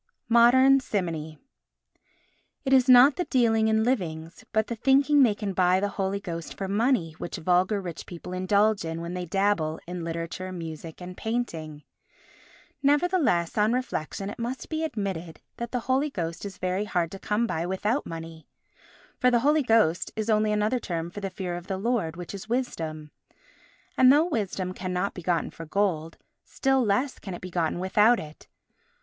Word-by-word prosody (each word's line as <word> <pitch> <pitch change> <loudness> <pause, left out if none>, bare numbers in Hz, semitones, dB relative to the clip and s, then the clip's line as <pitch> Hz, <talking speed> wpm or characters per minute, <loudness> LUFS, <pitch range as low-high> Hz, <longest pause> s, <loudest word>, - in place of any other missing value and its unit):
Modern 260 +4 +6
Simony 165 - -3 1.3
It 270 - +2
is 260 -1 +5
not 255 +3 +8
the 355 - -1
dealing 225 -5 +2
in 220 0 +2
livings 170 -9 -2
but 220 0 +2
the 235 - -4
thinking 275 +4 +4
they 230 -6 +4
can 205 -2 -4
buy 185 0 +3
the 205 +1 0
Holy 195 0 -2
Ghost 170 -4 -6
for 195 - -3
money 210 -3 +1
which 175 - -5
vulgar 185 +4 +2
rich 175 -4 -7
people 180 +1 -8
indulge 200 +3 +2
in 165 0 -4
when 170 +1 -5
they 180 -1 -4
dabble 185 -4 0
in 175 0 -5
literature, 165 +3 -4
music 165 -1 -7
and 180 0 -8
painting. 165 -11 -4 1.0
Nevertheless, 285 - +2
on 215 +2 +3
reflection 200 -6 -3
it - - -10
must 245 +3 -4
be 315 0 -2
admitted 195 - -4 0.2
that 235 -1 -5
the 250 - -1
Holy 265 +5 +1
Ghost 170 - -4
is 195 -2 -7
very 185 +3 -1
hard 175 -5 -1
to 195 - -8
come 215 +4 0
by 170 -6 -2
without 210 +8 0
money. 165 -1 -8 0.7
For 250 - +4
the 240 -1 +2
Holy 300 +3 +3
Ghost 220 - +2
is 220 +1 -1
only 215 0 +2
another 210 +4 +1
term 170 -5 -4
for 205 - -7
the 195 -1 -3
Fear 180 -1 -4
of 175 +1 -8
the 190 - -2
Lord, 205 -6 -1
which 175 +2 -7
is 200 +2 -8
Wisdom. 160 - -3 0.8
And 255 0 +7
though 300 +4 +5
Wisdom 195 - -2
cannot 185 +1 -2
be 180 - -8
gotten 170 -1 -1
for 165 - -10
gold, 165 -4 -1 0.3
still 270 -1 +1
less 240 +6 0
can 190 -4 -6
it - - -10
be 185 - -7
gotten 170 -2 0
without 210 +6 +3
it. 155 0 -11
195 Hz, 180 wpm, -26 LUFS, 170-235 Hz, 1.3 s, not